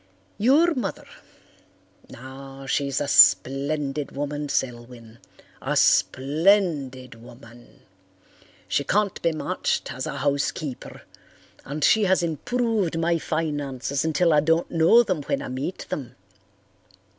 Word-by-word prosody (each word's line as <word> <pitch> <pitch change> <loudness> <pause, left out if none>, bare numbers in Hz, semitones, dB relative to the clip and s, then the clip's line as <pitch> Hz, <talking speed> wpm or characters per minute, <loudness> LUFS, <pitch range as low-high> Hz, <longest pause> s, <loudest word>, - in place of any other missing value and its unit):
Your 295 +10 +4
mother—now, 135 - -11
she's 140 0 -1
a 145 - -2
splendid 140 +6 +3
woman, 145 +1 -4
Selwyn, 120 -3 -5 0.4
a - - -1
splendid 145 - +2
woman. 120 0 -16 0.9
She 140 - 0
can't 205 +6 0
be 170 - +1
matched 155 - -2
as 130 - -5
a - - -5
housekeeper 140 0 -3 0.6
and 145 +2 -5
she 215 +5 +4
has 190 -1 +2
improved 205 - -1
my 165 0 +1
finances 145 -4 -3
until 160 +1 +2
I 150 - +5
don't 165 +3 +1
know 170 +9 +5
them 185 -8 -2
when - - -1
I - - -6
meet 130 +8 -5
them. 125 -4 -6
145 Hz, 110 wpm, -24 LUFS, 130-170 Hz, 0.9 s, I